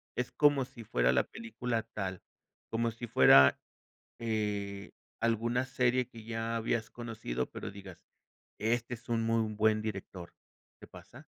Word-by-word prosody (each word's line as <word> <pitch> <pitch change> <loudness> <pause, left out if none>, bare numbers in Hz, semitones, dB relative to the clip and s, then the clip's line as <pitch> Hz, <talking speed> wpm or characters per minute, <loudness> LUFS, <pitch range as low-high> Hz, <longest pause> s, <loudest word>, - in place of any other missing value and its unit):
Es 125 0 -2
como 145 -3 +4
si 120 -2 -12
fuera 60 - +2
la - - +4
película 115 0 -4
tal 95 -3 -4 0.5
como 115 0 0
si 115 +2 -7
fuera, 70 -10 +7 0.6
eh, 105 -3 -2 0.3
alguna 115 +2 +1
serie 125 -1 +1
que 115 -3 -12
ya 115 0 -2
habías 115 0 -1
conocido, 110 - -4
pero - - -6
digas: 95 -4 -12 0.5
"Este 115 +3 0
es 120 +1 -14
un 115 -1 +1
muy 115 -1 +1
buen 110 0 +2
director", 95 -4 -6 0.5
¿te - - -11
pasa? - - -13
115 Hz, 140 wpm, -32 LUFS, 100-120 Hz, 0.6 s, fuera